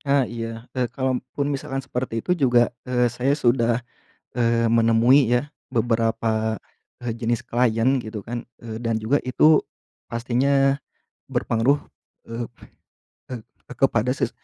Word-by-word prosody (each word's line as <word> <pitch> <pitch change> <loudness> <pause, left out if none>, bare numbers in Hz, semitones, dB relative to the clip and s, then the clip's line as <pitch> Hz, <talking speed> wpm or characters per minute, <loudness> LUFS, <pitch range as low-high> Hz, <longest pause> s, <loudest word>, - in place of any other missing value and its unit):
Ah, 140 -2 +2
iya, 115 0 -6
e 125 -2 -1
kalaupun 130 +2 -2
misalkan 135 -1 -3
seperti 125 -3 -3
itu 180 - +1
juga, 125 -7 +3 0.2
eee, 125 -1 +2
saya 130 +4 +1
sudah, 120 -2 +2 0.5
eee, 115 -1 +2
menemui 115 +4 +5
ya 145 +4 0 0.2
beberapa, 115 -1 +1 0.5
e 120 - -2
jenis 115 0 -1
klien 120 +2 +2
gitu 110 -3 -6
kan, 120 +2 -6 0.2
eee, 110 -1 -6
dan 115 -1 -1
juga 130 +7 +2
itu 150 +4 +5 0.5
pastinya 135 +4 +1 0.5
berpengaruh, 125 +6 +2 0.5
eee 115 0 -4 0.9
eee, 115 - -5 0.3
kepada 125 -1 +2
ses 125 - -1
120 Hz, 125 wpm, -23 LUFS, 115-130 Hz, 0.9 s, menemui